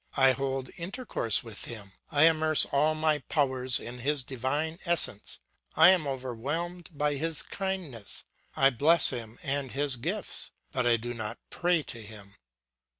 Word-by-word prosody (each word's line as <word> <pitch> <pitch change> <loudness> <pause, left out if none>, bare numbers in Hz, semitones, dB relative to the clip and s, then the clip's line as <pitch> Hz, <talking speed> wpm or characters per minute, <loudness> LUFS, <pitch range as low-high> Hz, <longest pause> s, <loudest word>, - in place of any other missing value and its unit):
I 135 -1 +6
hold 135 0 -3
intercourse 180 - 0
with 115 -4 -5
him; 105 -5 -8 0.2
I 145 +1 +4
immerse 155 -1 +5
all 150 +3 +1
my 155 -1 +2
powers 130 -5 0
in 125 +1 -7
his 140 +2 0
divine 145 +6 -3
essence; 170 - 0 0.4
I 160 +3 +8
am 175 -6 +1
overwhelmed 140 +7 -4
by 145 -1 -1
his 160 +1 -1
kindness, 185 - -5 0.3
I 135 0 +5
bless 155 +7 +5
him 115 -2 -6
and 140 -1 -2
his 140 -2 0
gifts, 115 - -3 0.2
but 125 -1 0
I 120 -1 +4
do 120 +2 -5
not 115 0 -4
pray 175 -3 +1
to 120 -4 -8
him. 105 -2 -12
135 Hz, 150 wpm, -28 LUFS, 120-160 Hz, 0.4 s, I